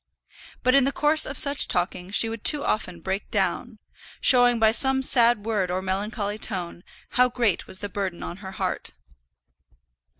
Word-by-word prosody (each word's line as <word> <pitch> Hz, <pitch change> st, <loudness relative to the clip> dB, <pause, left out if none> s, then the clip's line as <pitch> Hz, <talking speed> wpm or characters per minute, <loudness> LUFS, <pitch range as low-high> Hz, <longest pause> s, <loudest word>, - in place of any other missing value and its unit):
But 255 Hz, -, +3 dB
in 275 Hz, -1 st, +5 dB
the 275 Hz, -, 0 dB
course 300 Hz, +2 st, +3 dB
of 275 Hz, -, -6 dB
such 285 Hz, -2 st, +2 dB
talking 180 Hz, 0 st, -3 dB
she 205 Hz, +3 st, +2 dB
would 225 Hz, -1 st, -7 dB
too 295 Hz, -2 st, +4 dB
often 180 Hz, -5 st, -3 dB
break 190 Hz, +3 st, -4 dB
down, 215 Hz, +3 st, -2 dB, 0.4 s
showing 245 Hz, -1 st, +4 dB
by 220 Hz, -1 st, +4 dB
some 265 Hz, +3 st, +2 dB
sad 235 Hz, -4 st, +3 dB
word 205 Hz, -5 st, -1 dB
or 185 Hz, +1 st, -3 dB
melancholy 205 Hz, +2 st, -3 dB
tone 175 Hz, -4 st, -3 dB, 0.3 s
how 250 Hz, 0 st, +2 dB
great 235 Hz, -7 st, -1 dB
was 185 Hz, -, -7 dB
the 205 Hz, -, -3 dB
burden 190 Hz, -3 st, -4 dB
on 175 Hz, -, -7 dB
her 190 Hz, -1 st, -10 dB
heart. -, -, -4 dB
215 Hz, 170 wpm, -24 LUFS, 190-250 Hz, 0.4 s, in